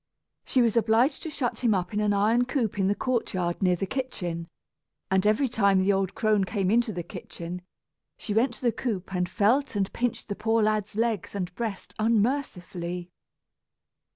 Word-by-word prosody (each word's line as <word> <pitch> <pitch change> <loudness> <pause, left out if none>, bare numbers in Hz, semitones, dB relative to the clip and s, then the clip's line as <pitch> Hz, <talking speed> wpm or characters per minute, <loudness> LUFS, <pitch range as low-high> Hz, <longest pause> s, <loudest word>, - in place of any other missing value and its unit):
She 255 - +2
was 230 -2 +2
obliged 230 +5 +3
to 325 - -5
shut 270 -5 -2
him 225 -4 +4
up 180 +1 -2
in 210 - 0
an 210 -1 +2
iron 220 +5 +3
coop 240 -6 -1
in 190 - +3
the 200 - +2
courtyard 185 -8 -1
near 180 -2 +3
the 185 - -2
kitchen; 180 -9 -3 0.6
and 190 +1 +3
every 215 +6 +3
time 200 -5 +3
the 195 +2 +3
old 195 -1 -1
crone 215 -3 +2
came 195 -1 0
into 235 0 +3
the 175 -3 -4
kitchen, 175 +2 -7 0.6
she 210 - -4
went 230 +5 +2
to - - -15
the 240 - +3
coop 200 -6 -4
and 180 -1 0
felt 240 +6 +2
and 195 -2 -1
pinched 245 -1 -2
the 205 - -3
poor 225 +2 +1
lad's 215 -1 0
legs 225 -3 -1
and 180 -3 -3
breast 220 -2 -5
unmercifully. 200 -7 -1
210 Hz, 180 wpm, -27 LUFS, 190-235 Hz, 0.6 s, him